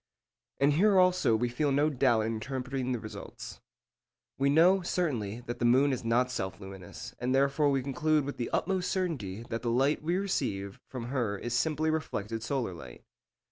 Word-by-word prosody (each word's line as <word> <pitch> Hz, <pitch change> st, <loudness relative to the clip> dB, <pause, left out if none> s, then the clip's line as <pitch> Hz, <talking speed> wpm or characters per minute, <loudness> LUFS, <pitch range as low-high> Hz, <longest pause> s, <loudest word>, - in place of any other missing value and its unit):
And 140 Hz, +1 st, +4 dB
here 195 Hz, +5 st, +4 dB
also 180 Hz, -10 st, +4 dB
we 120 Hz, +2 st, +1 dB
feel 140 Hz, +4 st, 0 dB
no 145 Hz, +3 st, +2 dB
doubt 125 Hz, -5 st, +3 dB
in 110 Hz, +1 st, -1 dB
interpreting 130 Hz, +2 st, -3 dB
the 125 Hz, -, 0 dB
result. 110 Hz, -, -9 dB, 0.8 s
We 140 Hz, +1 st, +3 dB
know, 175 Hz, +6 st, +5 dB
certainly, 120 Hz, -, -2 dB
that 120 Hz, 0 st, -6 dB
the -, -, -2 dB
moon 130 Hz, +4 st, +4 dB
is 125 Hz, -, -4 dB
not 120 Hz, +2 st, +2 dB
self 95 Hz, -6 st, -4 dB
luminous, 95 Hz, -2 st, -9 dB
and 125 Hz, +2 st, 0 dB
therefore 140 Hz, +2 st, +3 dB
we 135 Hz, -2 st, +1 dB
conclude 150 Hz, +2 st, +1 dB
with 145 Hz, -, -5 dB
the 120 Hz, -, -3 dB
utmost 185 Hz, -1 st, 0 dB
certainty 130 Hz, -, -2 dB
that 115 Hz, -, -2 dB
the 120 Hz, -, -1 dB
light 135 Hz, +5 st, +2 dB
we 170 Hz, +4 st, 0 dB
receive 100 Hz, -, -2 dB
from 120 Hz, -2 st, -6 dB
her 120 Hz, -7 st, -1 dB
is 120 Hz, +4 st, -4 dB
simply 155 Hz, +4 st, +1 dB
reflected 115 Hz, -8 st, -3 dB
solar 120 Hz, -4 st, -2 dB
light. 65 Hz, -7 st, -11 dB
130 Hz, 180 wpm, -30 LUFS, 115-150 Hz, 0.8 s, know